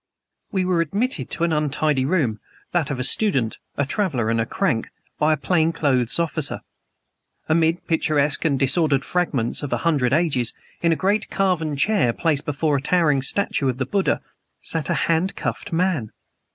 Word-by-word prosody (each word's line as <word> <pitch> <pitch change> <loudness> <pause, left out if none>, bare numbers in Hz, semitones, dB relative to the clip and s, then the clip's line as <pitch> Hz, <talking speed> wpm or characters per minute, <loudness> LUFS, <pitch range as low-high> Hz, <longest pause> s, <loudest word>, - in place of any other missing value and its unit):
We 190 -3 0
were 180 -2 +2
admitted 195 - -2
to 170 - -2
an 170 -1 +2
untidy 150 -2 +1
room 135 - 0 0.3
that 170 -5 0
of 135 -3 -3
a - - 0
student, 135 - +1 0.2
a 140 - +1
traveler 140 - 0
and 115 0 +1
a 110 - -2
crank 155 - 0 0.3
by 155 +1 +3
a 155 - +2
plain 160 +3 +1
clothes 130 -7 0
officer. 170 -3 -1 0.9
Amid 165 +2 +1
picturesque 150 -3 +1
and 145 -4 +2
disordered 140 +1 +2
fragments 145 -10 -1
of 145 - -5
a - - +1
hundred 140 -7 +2
ages, 140 -6 +1 0.3
in 170 - +3
a - - +3
great 205 +5 0
carven 175 -6 0
chair 145 - +2
placed 150 -1 0
before 145 0 +1
a - - -3
towering 150 -3 +2
statue 140 -2 0
of 125 - -2
the 130 - -1
Buddha, 195 +8 0 0.4
sat 160 -4 -3
a - - +2
hand 170 +3 +1
cuffed 200 - -4
man. 165 - 0
155 Hz, 175 wpm, -22 LUFS, 135-175 Hz, 0.9 s, by